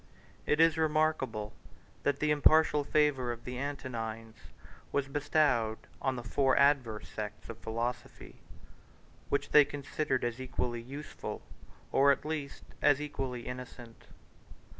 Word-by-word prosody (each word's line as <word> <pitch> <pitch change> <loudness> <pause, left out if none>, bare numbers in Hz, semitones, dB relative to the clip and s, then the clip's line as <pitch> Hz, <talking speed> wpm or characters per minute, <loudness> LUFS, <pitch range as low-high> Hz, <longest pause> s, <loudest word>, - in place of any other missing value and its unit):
149 - - +2
It 165 +2 +6
is 160 -1 -4
remarkable, 155 -9 0 0.5
that 145 -1 +1
the 150 0 +2
impartial 150 0 +5
favor 145 -4 +2
of 120 0 -7
the 125 0 -5
Antonines 115 -5 -5 0.6
was 140 -1 0
bestowed 140 -6 +1 0.2
on 135 -1 0
the 120 - -6
four 130 +3 +2
adverse 135 -6 +2
sects 105 -1 -7
of 115 -1 -7
philosophy, 115 +2 -5 0.9
which - - -1
they 150 - +9
considered 145 -1 -2
as 120 +1 -2
equally 125 -2 -3
useful, 140 +5 -7 0.5
or 140 +1 +5
at 140 - -1
least, 150 -3 -4 0.2
as 145 -1 +5
equally 135 -5 -4
innocent. 125 -2 -9
135 Hz, 130 wpm, -31 LUFS, 120-145 Hz, 0.9 s, they